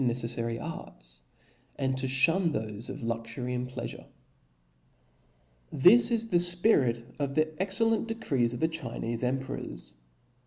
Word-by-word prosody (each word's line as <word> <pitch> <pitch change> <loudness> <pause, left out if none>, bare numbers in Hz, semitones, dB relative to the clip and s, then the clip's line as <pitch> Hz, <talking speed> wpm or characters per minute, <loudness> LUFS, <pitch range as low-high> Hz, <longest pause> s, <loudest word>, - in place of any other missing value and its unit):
neccf* 120 -1 -1
fary 115 -1 -3
arts, - - -9 0.5
and 130 -1 -1
to 130 0 -2
fhun 165 +6 +4
thofe 110 -1 -5
of - - -7
luxury 115 +2 -4
and 125 0 -3
plea 130 - -5
fure. - - -10 1.7
This 210 - +6
is 230 -1 0
the 175 - +3
fpirit 175 - +3 0.2
of 140 -1 -2
the 155 0 +1
excellent 225 +4 0
decrees 160 - -1
of 120 - -6
the 160 - +3
Chinefe 120 -7 -4
emperors. 125 - -4
130 Hz, 140 wpm, -28 LUFS, 115-175 Hz, 1.7 s, This